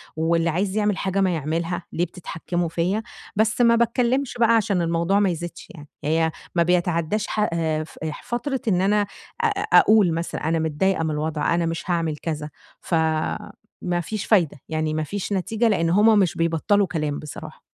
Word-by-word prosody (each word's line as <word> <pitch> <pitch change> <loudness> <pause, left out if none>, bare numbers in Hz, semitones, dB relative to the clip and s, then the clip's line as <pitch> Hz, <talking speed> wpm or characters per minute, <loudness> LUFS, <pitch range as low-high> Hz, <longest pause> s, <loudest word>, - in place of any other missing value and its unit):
واللي 165 +1 +1
عايز 190 +5 -1
يعمل 210 -2 +1
حاجة 195 0 0
ما 185 -2 +2
يعملها، 165 +3 -2
ليه 175 - +1
بتتحكموا 175 -1 -4
فيَّا 180 +7 -1 0.3
بس 220 +3 +2
ما 235 -1 +6
باتكلمش 245 +3 +1
بقى 230 -1 +5
عشان 200 -4 +1
الموضوع 170 +4 +1
ما 200 -2 +3
يزيدش 175 0 -6
يعني، 150 -3 -12 0.2
هي 160 +2 +1 0.2
ما 170 - +4
بيتعداش 175 +3 0
ح - - -3
آآ، 160 -2 0
ف 155 - -15
أح 155 -1 -5
فترة 265 +2 -3
إن 185 -4 +2
أنا 205 +2 +3
أ 200 -1 -8
أ 420 0 +2
أقول 210 -6 +4
مثلًا 165 +1 -3
أنا 165 +1 0
متضايقة 160 +3 0
من 160 - -1
الوضع 150 +1 -1
أنا 170 0 +1
مش 165 0 -3
هاعمل 165 -3 0
كذا، 155 -1 -4 0.3
فما 160 +2 -2
فيش 210 +5 -4
فايدة، 175 -9 +3
يعني 155 -1 -1
ما 155 0 -1
فيش 200 +5 -4
نتيجة 220 +5 0
لإن 170 -6 +2
هُم 210 +4 +5
مش 185 -4 +1
بيبطّلوا 165 +5 +2
كلام 150 -4 -2
بصراحة. 150 - -9
175 Hz, 180 wpm, -23 LUFS, 160-205 Hz, 0.3 s, ما